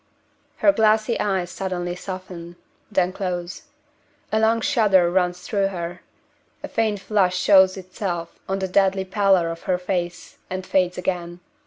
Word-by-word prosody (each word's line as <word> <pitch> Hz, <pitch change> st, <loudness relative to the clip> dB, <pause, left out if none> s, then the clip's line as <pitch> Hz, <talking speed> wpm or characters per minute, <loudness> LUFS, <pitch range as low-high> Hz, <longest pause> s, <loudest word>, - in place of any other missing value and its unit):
Her 300 Hz, -, +5 dB
glassy 220 Hz, -2 st, +2 dB
eyes 190 Hz, -3 st, -1 dB
suddenly 175 Hz, -2 st, -3 dB
soften 180 Hz, -2 st, -8 dB, 0.4 s
then 185 Hz, -2 st, +1 dB
close. 180 Hz, -3 st, -4 dB, 0.6 s
A 220 Hz, -, +2 dB
long 225 Hz, +1 st, +3 dB
shudder 190 Hz, -7 st, +3 dB
runs 180 Hz, -1 st, 0 dB
through 200 Hz, -2 st, 0 dB
her. 175 Hz, -2 st, -5 dB, 0.6 s
A -, -, -4 dB
faint 215 Hz, -2 st, 0 dB
flush 190 Hz, -2 st, +1 dB
shows 190 Hz, 0 st, +5 dB
itself 180 Hz, -2 st, -5 dB
on 195 Hz, -, 0 dB
the 190 Hz, -1 st, -2 dB
deadly 190 Hz, 0 st, +2 dB
pallor 190 Hz, -3 st, +2 dB
of 165 Hz, 0 st, -6 dB
her 180 Hz, -, +3 dB
face, 180 Hz, -1 st, -4 dB
and 185 Hz, 0 st, -4 dB
fades 180 Hz, -2 st, +1 dB
again. 175 Hz, -1 st, -3 dB
185 Hz, 145 wpm, -23 LUFS, 180-195 Hz, 0.6 s, Her